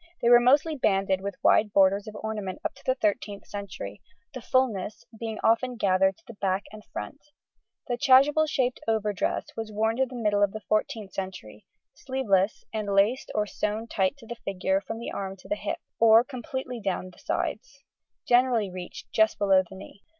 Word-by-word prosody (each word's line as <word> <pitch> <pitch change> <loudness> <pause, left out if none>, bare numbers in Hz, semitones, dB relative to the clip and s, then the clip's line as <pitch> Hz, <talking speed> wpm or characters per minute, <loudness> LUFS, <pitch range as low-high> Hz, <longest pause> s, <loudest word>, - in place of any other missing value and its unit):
They 235 - +2
were 240 0 +9
mostly 285 +6 +3
banded 195 -6 +1
with 200 -1 -4
wide 210 -1 +4
borders 195 +1 +4
of 215 - -8
ornament 210 -3 -4
up - - -1
to - - -19
the 260 - +1
13th 205 -3 -2
century, 185 - -7 0.3
the 255 - -6
fullness 225 -6 0
being 225 -2 -4
often 245 +3 +2
gathered 190 -3 +2
to 330 - -26
the 235 - -10
back 195 -1 -1
and 215 0 -11
front. 285 - -7 0.7
The 245 - -1
chasuble 290 +3 +5
shaped 255 -4 0
overdress 215 -3 0
was 225 -1 -5
worn 220 +2 0
to 265 0 +2
the 255 - -10
middle 210 -4 +1
of 205 -1 +3
the 215 - -6
14th 215 -1 -2
century, 185 - -7 0.3
sleeveless, 215 -7 0
and, 210 -2 -2
laced 215 +7 +2
or 210 -1 +2
sewn 210 +2 -3
tight 195 +2 0
to 245 - -15
the 235 +1 -7
figure 190 0 0
from 225 - -6
the 235 - -6
arm 195 -1 -4
to 185 - -16
the - - 0
hip, - - -3 0.2
or 225 0 +7
completely 255 -1 -6
down 185 -3 -3
the - - -20
sides, 275 +5 -4 0.4
generally 240 -5 +3
reached 180 -1 -9
just 220 0 +3
below 195 -2 +4
the 190 +1 -12
knee. 195 +1 -12
215 Hz, 185 wpm, -27 LUFS, 195-245 Hz, 0.7 s, were